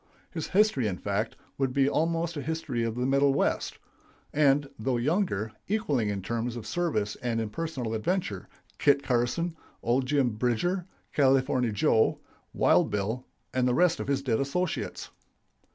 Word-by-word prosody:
His 160 -3 -4
history, 195 - +3
in 95 -3 -2
fact, 100 +3 -2 0.2
would 135 -2 +1
be 135 0 +3
almost 165 +3 0
a 145 - -3
history 145 -5 -2
of 115 -1 -2
the 125 +1 -1
middle 140 +1 +3
West; - - 0 0.6
and, 145 -1 +3
though 125 +2 0
younger, 120 - 0 0.2
equaling 145 - 0
in 100 -2 -3
term 115 +4 -2
of 120 -2 -5
service 110 -8 -1
and 120 -2 -1
in 110 -2 -3
personal 130 -5 -3
adventure, 110 - -2 0.3
Kit 140 -1 +4
Carson, 130 +8 0 0.3
old 125 +3 +1
Jim 140 -3 +2
Bridger, 125 - 0 0.3
California 130 -3 +3
Joe, 110 +2 +3 0.3
Wild - - +3
Bill, 105 +5 -2 0.3
and 125 -1 +2
the 125 - +2
rest 175 +1 +3
of - - -4
his 140 -1 0
dead 115 -5 +1
associates. 165 +6 -2
130 Hz, 155 wpm, -28 LUFS, 115-155 Hz, 0.6 s, Kit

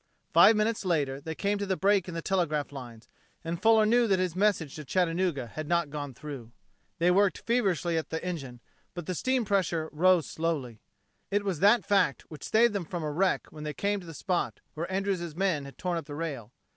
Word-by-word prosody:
Five 225 - +8
minutes 215 +1 0
later 145 -7 0
they 160 +2 -5
came 200 +3 -1
to 200 - -1
the 190 -1 0
break 195 -2 +2
in 175 - -6
the 165 - -4
telegraph 160 -7 0
lines, 120 -5 -10 0.4
and 170 +1 -4
Fuller 220 0 +5
knew 235 +2 +4
that 195 -2 +3
his 180 -2 -1
message 185 -7 +1
to 155 - -6
Chattanooga 170 -2 0
had 155 +6 -7
not 170 -3 +1
gone 145 -3 -5
through. 135 -5 -8 0.5
They 175 0 +3
worked 195 +1 +3
feverishly 185 - +1
at 160 - -7
the 160 +2 -4
engine, 135 -9 -5 0.3
but 175 - -5
the 185 - -2
steam 255 +6 0
pressure 175 -5 0
rose 175 +1 +4
slowly. 145 -9 -3 0.5
It 205 0 0
was 185 -6 -1
that 205 +1 +5
fact 195 - +2
which 155 - -10
saved 230 0 +4
them 200 -3 -2
from 170 0 -5
a 150 - -2
wreck 185 +5 +1
when 155 -1 -9
they 150 -1 -4
came 205 0 0
to 175 - -12
the 165 - -9
spot 180 0 -2
where 170 +4 -4
Andrews' 190 -4 -2
men 175 -6 0
had 140 - -11
torn 180 -1 -2
up 165 - -11
the 145 - -6
rail. 140 -9 -5
170 Hz, 215 wpm, -28 LUFS, 150-195 Hz, 0.5 s, Five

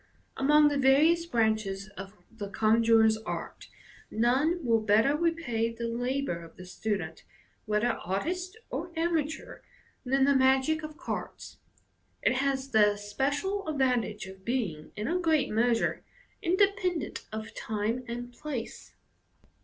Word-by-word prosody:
Among 295 +2 +5
the 285 -1 -1
various 310 +6 +4
branches 215 -6 0
of 200 0 -10 0.2
the 210 -3 -7
conjuror's 220 +1 +4
art, 220 - -6 0.4
none 270 +9 +1
will 230 -1 +4
better 220 +7 +3
repay 300 -9 0
the 230 0 -4
labour 245 -6 -2
of 165 - -14
the 185 - -11
student, 180 -3 -4 0.4
whether 210 +3 +2
artist 355 - -3
or 350 - -4
amateur, 320 -2 -2 0.4
than 270 +1 +2
the 280 - +4
magic 265 +4 +3
of 305 0 -8
cards. - - -6 0.6
It - - +4
has 270 0 0
the 210 -3 +5
especial 280 - -2
advantage 250 -8 0
of 190 0 -12
being, 195 -11 -2
in 210 +2 -3
a 355 +2 0
great 320 -4 +2
measure, 230 +1 +1 0.4
independent 370 -1 0
of 220 0 -6
time 220 +3 -2
and 240 +1 -6
place. 255 -3 -6
245 Hz, 130 wpm, -29 LUFS, 215-300 Hz, 0.6 s, Among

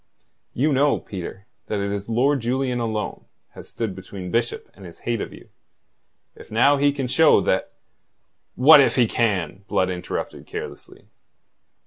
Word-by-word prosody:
You 145 +4 +2
know, 140 +2 +3
Peter, 95 +1 -8 0.2
that 105 - -2
it 100 0 -2
is 100 +1 -5
Lord 135 +5 +2
Julian 125 +1 -1
alone 110 -2 -3 0.3
has - - -12
stood 110 -4 -4
between 95 -1 -8
Bishop 115 0 -1
and 100 - -15
his 85 -2 -11
hate 115 -2 -2
of - - -5
you. - - -14 0.9
If - - -14
now 140 +6 +4
he 145 +1 +3
can 140 -2 -3
show 155 +5 +5
that...." - - -1 0.8
"What 145 +3 +8
if - - +2
he 125 - +4
can?" 100 -5 -1
Blood 95 -3 +1
interrupted 90 -1 -5
carelessly. - - -8
115 Hz, 155 wpm, -23 LUFS, 100-135 Hz, 0.9 s, What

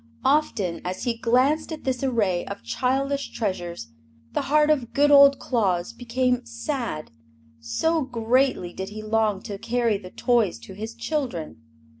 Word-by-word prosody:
Often, 260 - +1
as 180 +1 -4
he 240 -2 0
glanced 255 +8 +2
at 315 - -6
this 260 -1 -2
array 210 -9 +1
of 200 - -7
childish 275 +2 -1
treasures, 175 - -4 0.4
the - - +1
heart 300 +1 +4
of 260 -6 0
good 290 +1 +4
old 280 -1 +8
Claus 200 -4 0
became 250 +1 0
sad, 235 - -4 0.5
so 315 - 0
greatly 245 -6 +1
did 190 +1 -5
he 215 +1 -8
long 215 -2 +1
to 200 -1 -6
carry 230 -3 0
the 185 -2 -10
toys 230 - +1
to 115 - -10
his 220 +4 -7
children. 235 - -3
235 Hz, 150 wpm, -24 LUFS, 195-270 Hz, 0.5 s, old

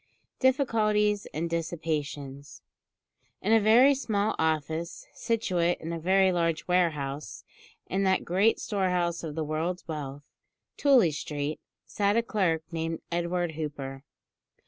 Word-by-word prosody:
DIFFICULTIES 215 -6 +2
AND 160 +3 -2
DISSIPATIONS. 155 -4 -4 0.8
In 210 +4 +3
a 225 - +7
very 235 +6 +6
small 215 -6 0
office, 160 +1 -1
situate 185 -7 0
in 165 +1 -5
a 165 - -3
very 190 +3 +3
large 165 -2 0
warehouse, 150 - -1 0.4
in 190 - -1
that 190 -1 +2
great 195 +6 +2
storehouse 180 -5 -1
of 155 -2 -5
the 160 - -1
world's 160 +4 -3
wealth, 145 -3 -5 0.5
Tooley 260 - +4
Street, 150 0 -4 0.3
sat 205 +1 +1
a 230 - +3
clerk 180 -8 0
named 165 0 -3
Edward 175 0 -1
Hooper. 140 -3 -6
170 Hz, 125 wpm, -28 LUFS, 155-200 Hz, 0.8 s, a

